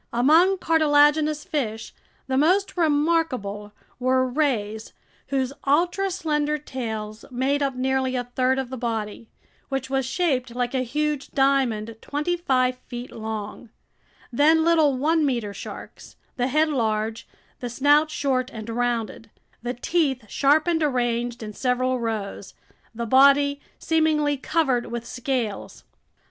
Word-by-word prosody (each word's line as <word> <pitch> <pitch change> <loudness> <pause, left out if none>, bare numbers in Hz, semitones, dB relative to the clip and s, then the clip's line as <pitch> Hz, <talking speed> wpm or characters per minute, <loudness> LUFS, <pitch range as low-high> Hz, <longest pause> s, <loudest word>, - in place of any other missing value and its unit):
Among 320 +11 +4
cartilaginous 300 -2 +3
fish, 225 -7 -3 0.3
the 260 - -2
most 360 +8 +2
remarkable 290 - 0 0.3
were 255 +1 +2
rays 230 -6 -1 0.3
whose 265 -1 -1
ultra 350 +7 +2
slender 300 -4 -1
tails 220 -6 -6
made 265 +3 0
up 275 -2 0
nearly 260 0 0
a 250 - -1
third 255 +2 0
of 265 -2 -3
the 260 - -4
body, 225 -2 -4 0.4
which 270 -1 -3
was 270 -2 0
shaped 260 -6 -1
like 245 0 -1
a 260 - +1
huge 295 +3 -2
diamond 250 -6 +1
twenty 300 +5 -2
five 255 -7 +1
feet 245 0 -7
long; 220 +1 -6 0.6
then 315 +5 +4
little 315 -5 +3
one 315 +4 +2
meter 235 -7 -1
sharks, - - -10 0.2
the 245 -1 0
head 305 +4 +2
large, 220 -4 -1 0.3
the 245 - -4
snout 290 +5 +3
short 270 -4 -1
and 220 0 -8
rounded, 230 -1 -2 0.3
the 245 +1 -3
teeth 265 -3 0
sharp 290 +7 +3
and 335 -2 +1
arranged 240 -4 -1
in 210 -1 -7
several 255 +1 0
rows, 215 -4 -4 0.4
the 235 +1 -3
body 280 +3 +4 0.2
seemingly 310 -2 +1
covered 270 -3 0
with 235 0 -5
scales. 245 -4 -4
260 Hz, 130 wpm, -24 LUFS, 240-300 Hz, 0.6 s, Among